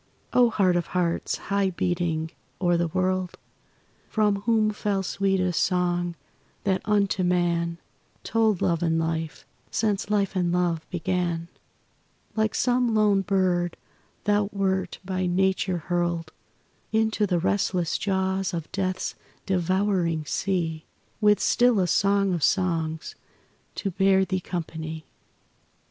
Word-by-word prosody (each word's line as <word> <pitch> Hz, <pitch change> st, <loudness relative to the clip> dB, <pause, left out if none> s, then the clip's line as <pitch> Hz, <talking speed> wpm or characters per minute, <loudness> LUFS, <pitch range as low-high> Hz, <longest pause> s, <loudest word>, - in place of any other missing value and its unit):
O 245 Hz, -1 st, +5 dB
Heart 190 Hz, -5 st, +2 dB
of 170 Hz, -, -2 dB
Hearts! 170 Hz, -2 st, 0 dB
high 200 Hz, -1 st, +2 dB
beating 170 Hz, -3 st, -1 dB, 0.3 s
o'er 175 Hz, -2 st, +2 dB
the 170 Hz, 0 st, +1 dB
world 185 Hz, +1 st, -1 dB, 0.7 s
From 210 Hz, -2 st, +2 dB
whom 220 Hz, -2 st, +3 dB
fell 205 Hz, -2 st, -1 dB
sweetest 185 Hz, -2 st, 0 dB
song 175 Hz, -1 st, 0 dB, 0.5 s
that 190 Hz, -2 st, +1 dB
unto 200 Hz, -2 st, +2 dB
man 170 Hz, -2 st, +1 dB, 0.5 s
Told 220 Hz, -4 st, +1 dB
love 170 Hz, -2 st, +1 dB
and 165 Hz, -1 st, +1 dB
life, 160 Hz, -2 st, -2 dB, 0.2 s
since 210 Hz, -2 st, -1 dB
life 200 Hz, -2 st, +1 dB
and 180 Hz, -2 st, +1 dB
love 175 Hz, -2 st, 0 dB
began; 175 Hz, -2 st, -2 dB, 0.9 s
Like 220 Hz, -1 st, +1 dB
some 245 Hz, -2 st, +2 dB
lone 210 Hz, -2 st, +4 dB
bird 185 Hz, -3 st, +1 dB, 0.5 s
thou 205 Hz, -1 st, +2 dB
wert 190 Hz, -2 st, -1 dB
by 185 Hz, -1 st, -1 dB
Nature 190 Hz, 0 st, +1 dB
hurled 170 Hz, -1 st, -2 dB, 0.6 s
Into 220 Hz, -1 st, +1 dB
the 180 Hz, -2 st, +1 dB
restless 180 Hz, -1 st, 0 dB
jaws 190 Hz, -1 st, 0 dB
of 165 Hz, -2 st, -5 dB
death's 185 Hz, -1 st, -2 dB, 0.3 s
devouring 185 Hz, -3 st, +1 dB
sea 165 Hz, -3 st, -1 dB, 0.4 s
With 210 Hz, -1 st, +5 dB
still 240 Hz, 0 st, +3 dB
a 185 Hz, -, +3 dB
Song 200 Hz, +1 st, +2 dB
of 170 Hz, -, -2 dB
Songs 165 Hz, -2 st, 0 dB, 0.6 s
to 195 Hz, -, -2 dB
bear 190 Hz, +1 st, +3 dB
thee 185 Hz, 0 st, -1 dB
company. 160 Hz, -3 st, -5 dB
185 Hz, 125 wpm, -25 LUFS, 170-200 Hz, 0.9 s, O